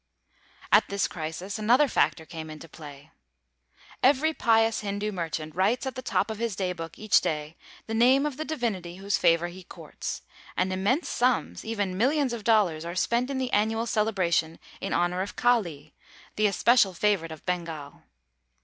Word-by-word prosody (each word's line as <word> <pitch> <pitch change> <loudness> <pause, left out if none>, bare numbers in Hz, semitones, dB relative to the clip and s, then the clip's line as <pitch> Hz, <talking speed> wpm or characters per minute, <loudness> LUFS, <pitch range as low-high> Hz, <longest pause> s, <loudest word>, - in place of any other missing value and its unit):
At 210 +1 +6
this 200 0 0
crisis 175 +5 -5
another 245 +7 +4
factor 160 -9 +1
came 160 -1 -8
into 155 +1 -9
play. 145 -1 -12 0.9
Every 290 +4 +4
pious 225 -4 +2
Hindoo 205 +1 -2
merchant 160 -4 -4
writes 200 - +1
at 265 - -3
the 255 - -6
top 240 - 0
of 220 - -6
his 230 -4 -2
day 185 -1 -1
book 165 -2 -8
each 215 -1 +3
day 150 +1 -3 0.3
the 225 - -5
name 255 +5 +4
of 295 -3 -2
the 310 - -2
divinity 220 - -3
whose 200 +2 -1
favor 170 +1 +3
he 185 +2 -11
courts, - - -7 0.3
and 185 0 +1
immense 205 - 0
sums 250 0 0
even 205 -4 -2
millions 270 +1 +2
of 230 -3 -5
dollars 200 -8 +3
are 170 +1 -5
spent 235 +7 +1
in 275 - -2
the 260 -1 -2
annual 220 +2 +1
celebration 185 -8 0 0.2
in - - -4
honor 175 +1 +1
of 195 - -5
Kali, 170 -12 0 0.4
the 215 0 +3
especial 205 -1 +3
favorite 180 -3 +1
of 160 - -10
Bengal. 165 -5 -4
200 Hz, 170 wpm, -27 LUFS, 170-235 Hz, 0.9 s, At